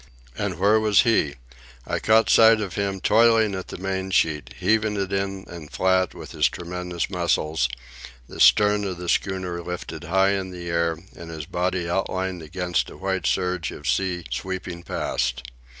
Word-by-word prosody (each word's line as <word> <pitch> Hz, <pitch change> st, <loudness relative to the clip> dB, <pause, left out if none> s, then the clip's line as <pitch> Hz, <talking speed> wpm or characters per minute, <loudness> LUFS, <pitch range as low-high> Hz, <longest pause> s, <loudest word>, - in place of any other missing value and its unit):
And 100 Hz, -4 st, -3 dB
where 105 Hz, +4 st, +4 dB
was 105 Hz, -2 st, +4 dB
he? 75 Hz, -11 st, +2 dB, 0.5 s
I -, -, -2 dB
caught 110 Hz, +1 st, +4 dB
sight 110 Hz, 0 st, +6 dB
of 100 Hz, -4 st, -4 dB
him 100 Hz, -2 st, -2 dB
toiling 110 Hz, -1 st, +4 dB
at 95 Hz, -1 st, -5 dB
the -, -, -7 dB
main 95 Hz, 0 st, -3 dB
sheet, 80 Hz, -5 st, 0 dB
heaving 105 Hz, +2 st, +1 dB
it 100 Hz, 0 st, -2 dB
in 100 Hz, 0 st, -2 dB
and 85 Hz, -3 st, -10 dB
flat 95 Hz, -1 st, +1 dB
with -, -, -9 dB
his -, -, +2 dB
tremendous 90 Hz, 0 st, -4 dB
muscles, 80 Hz, -6 st, 0 dB, 0.6 s
the -, -, -11 dB
stern 105 Hz, 0 st, +5 dB
of 95 Hz, -3 st, -3 dB
the 90 Hz, 0 st, -7 dB
schooner 90 Hz, -1 st, -1 dB
lifted 90 Hz, 0 st, -6 dB
high 95 Hz, +3 st, +3 dB
in 95 Hz, -1 st, -2 dB
the 90 Hz, -1 st, -7 dB
air 85 Hz, -1 st, +1 dB, 0.2 s
and 85 Hz, -1 st, -10 dB
his 80 Hz, -3 st, -6 dB
body 90 Hz, +1 st, -1 dB
outlined 95 Hz, 0 st, -2 dB
against 90 Hz, +3 st, -2 dB
a -, -, -12 dB
white 95 Hz, -2 st, -2 dB
surge 90 Hz, -3 st, 0 dB
of 70 Hz, -, -8 dB
sea 90 Hz, +7 st, 0 dB
sweeping 95 Hz, -2 st, -4 dB
past. 65 Hz, -6 st, -2 dB
95 Hz, 170 wpm, -24 LUFS, 85-100 Hz, 0.6 s, sight